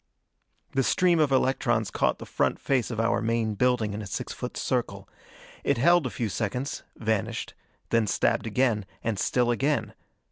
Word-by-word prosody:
The 135 - +1
stream 175 +5 +3
of 150 -3 +3
electrons 120 -4 +1
caught - - +1
the - - -9
front - - 0
face 130 -4 0
of 115 -3 -4
our 115 0 +2
main 115 -1 0
building 115 -1 +1
in 105 - -4
a 105 - -6
six - - -4
foot - - -6
circle. - - -2 0.6
It 140 - +1
held 170 +3 +4
a - - -3
few 115 +2 -2
seconds, 120 +6 -3
vanished; 110 -2 -2 0.4
then 115 -2 +3
stabbed 105 - +1
again, 110 -3 +1 0.2
and 110 -4 -1
still 120 +2 +2
again. 140 +5 0
120 Hz, 170 wpm, -27 LUFS, 110-135 Hz, 0.6 s, held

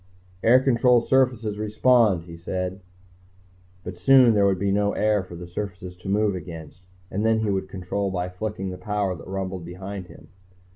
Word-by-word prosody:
"Air 125 +3 +6
control 125 -2 +3
surfaces 120 -5 +1
respond," 110 -3 +3
he 85 -1 -10
said. 90 +3 -4 1.0
But 90 -1 -8
soon 130 +2 +6
there 100 -2 +4
would 95 -1 +1
be 100 +1 0
no 100 +1 +1
air 105 -1 +2
for 90 -2 -10
the 90 +1 -8
surfaces 90 0 -6
to 90 - -8
move 105 0 +2
against, 80 -2 -9 0.3
and 100 +3 -2
then 110 0 +2
he 105 -2 0
would 95 -1 -2
control 95 +2 -3
by 90 -1 -2
flicking 95 +1 -5
the 90 - -8
power 105 -3 -1
that - - -12
rumbled 95 -1 -4
behind 95 +2 -7
him. - - -15
100 Hz, 180 wpm, -24 LUFS, 90-110 Hz, 1.0 s, Air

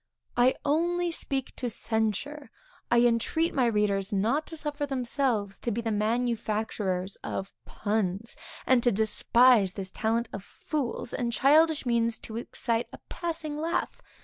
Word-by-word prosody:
I 245 +2 +4
only 345 +4 +1
speak 270 -5 -2
to 250 - -2
censure; 225 +7 -2 0.4
I 240 0 +5
entreat 240 +8 +2
my 255 -3 +3
readers 210 -2 +1
not 225 +10 +1
to 325 - -3
suffer 295 -1 -2
themselves 245 -6 -1
to - - -3
be 230 +1 -1
the 230 -1 -2
manufacturers 215 -4 -1
of 195 - -5
puns, 210 0 -2 0.3
and 255 -2 +4
to 240 - +3
despise 220 0 +4
this 190 -1 -5
talent 230 +3 0
of 195 - -6
fools 260 0 -3
and 235 -1 -1
childish 300 +5 +4
means 230 -2 +1
to 220 - -6
excite 230 0 -2
a - - -9
passing 320 -3 -3
laugh. 330 +2 -2
235 Hz, 145 wpm, -28 LUFS, 215-280 Hz, 0.4 s, I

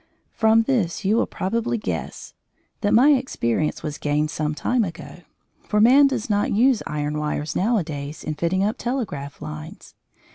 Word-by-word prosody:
From 220 0 +3
this 215 -8 -1
you 205 +3 +3
will 235 - +2
probably 230 +5 -2
guess 210 - -5 0.5
that 205 - 0
my 260 +6 +6
experience 155 - 0
was 150 -1 -5
gained 150 +1 0
some 150 +1 -2
time 245 +8 +1
ago, 170 -3 -7 0.5
for 210 - +1
man 265 +6 +7
does 260 -5 -2
not 205 -1 +1
use 245 +2 +3
iron 150 0 -2
wires 150 0 -3
nowadays 160 -9 -1
in 155 - -3
fitting 170 +5 0
up 210 +2 -1
telegraph 200 - -4
lines. 75 0 -9
195 Hz, 155 wpm, -23 LUFS, 150-230 Hz, 0.5 s, man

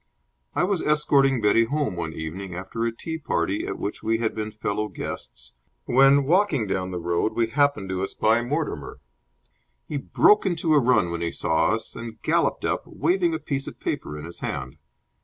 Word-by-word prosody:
I - - +2
was 190 -1 +1
escorting 140 -4 +3
Betty 110 +2 +4
home 145 -4 -1
one 85 -2 -3
evening 85 +4 -6
after 95 +5 -4
a 115 - 0
tea 160 +8 -6
party 100 - -1
at - - -4
which 100 - -4
we 115 +1 +1
had 115 -1 -1
been 110 0 -3
fellow 105 0 -2
guests, - - -6 0.3
when, 135 +2 +5
walking 165 - +2
down 95 -2 -2
the 90 - -4
road, 85 +4 0
we 115 - +2
happened 140 -7 +1
to 95 0 -2
espy 110 +4 +1
Mortimer. 150 +5 -3 0.9
He 150 - -3
broke 210 +8 +4
into 170 -4 +1
a 150 - +6
run 120 -9 +3
when 85 0 -3
he 85 0 -1
saw 80 - +1
us, 110 0 -1
and 115 -1 -8
galloped - - +1
up, - - 0
waving 170 +1 +1
a - - 0
piece 140 -1 -3
of - - -8
paper 75 - -3
in 75 - -7
his 85 - -7
hand. 65 +4 -4
115 Hz, 190 wpm, -25 LUFS, 95-145 Hz, 0.9 s, a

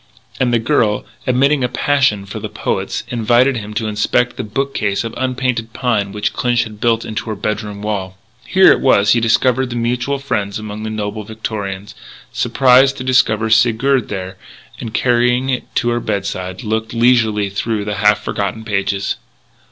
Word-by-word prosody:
And 125 -2 +2
the 120 - +3
girl, 115 -3 +1 0.2
admitting 135 +2 +3
a 125 - +1
passion 130 -7 +1
for - - -7
the - - -5
poets, - - -3
invited 120 +3 +2
him 105 -1 -7
to 110 - -1
inspect 110 +3 0
the - - -4
bookcase 110 -3 -1
of 115 0 -5
unpainted 125 -3 -2
pine 105 -6 0
which 105 +1 -2
Clinch 120 -1 +1
had 105 -2 -11
built 115 -1 +1
into 110 +1 -4
her 110 - -2
bedroom 105 0 -4
wall. 95 -3 -3 0.3
Here 190 +1 +6
it - - +3
was 100 -6 +4
he 120 - +4
discovered 120 +2 +1
mutual 120 +4 -1
friends 115 -7 -2
among 110 0 -7
the 110 - -4
nobler 105 0 -4
Victorians 105 -3 -5 0.4
surprised 135 +1 +4
to 130 - -5
discover 110 -4 +2
Sigurd 120 +3 +3
there 95 -1 -5 0.4
and, 115 - -6
carrying 125 +2 +2
it 125 - -2
to 120 - +1
her 120 0 0
bedside, 95 -1 -4
looked 110 +1 -2
leisurely 110 -4 +2
through 105 +1 -2
the 105 0 -3
half 105 0 +3
forgotten 100 +2 -3
pages. 100 -1 -1
115 Hz, 165 wpm, -17 LUFS, 105-125 Hz, 0.4 s, Here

